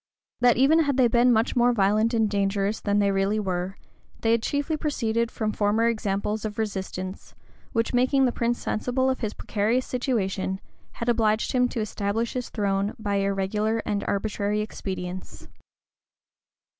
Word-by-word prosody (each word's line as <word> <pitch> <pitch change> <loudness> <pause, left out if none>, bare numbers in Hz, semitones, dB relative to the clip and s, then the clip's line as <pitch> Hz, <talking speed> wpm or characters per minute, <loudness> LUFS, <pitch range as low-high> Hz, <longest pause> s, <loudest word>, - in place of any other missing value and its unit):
That 245 -2 +4
even 280 +6 +5
had 285 -4 +1
they 255 -2 +5
been 240 +1 +4
much 225 0 +2
more 245 0 +4
violent 215 +2 +2
and 220 -1 +3
dangerous 200 +1 0
than 205 0 +1
they 200 -1 +3
really 195 +2 +1
were, 185 -1 -2 0.4
they 225 - +2
had 230 0 +3
chiefly 285 +5 -1
proceeded 235 -7 -1
from 220 -2 -2
former 210 +2 +2
examples 210 -1 -1
of 210 -1 -4
resistance, 190 -3 -4 0.4
which, 230 0 0
making 260 +2 +3
the 250 - +2
prince 235 0 0
sensible 260 +4 0
of 260 - -3
his 215 -2 -3
precarious 225 +4 0
situation, 195 -7 -1 0.3
had 230 - -5
obliged 220 -2 +2
him 250 -1 +3
to 235 - -3
establish 215 +2 -2
his 250 -1 -3
throne 200 -1 -1
by 205 -2 -1
irregular 200 +3 0
and 205 -1 -1
arbitrary 205 0 -1
expedients. 185 -3 -6
215 Hz, 155 wpm, -25 LUFS, 200-240 Hz, 0.4 s, even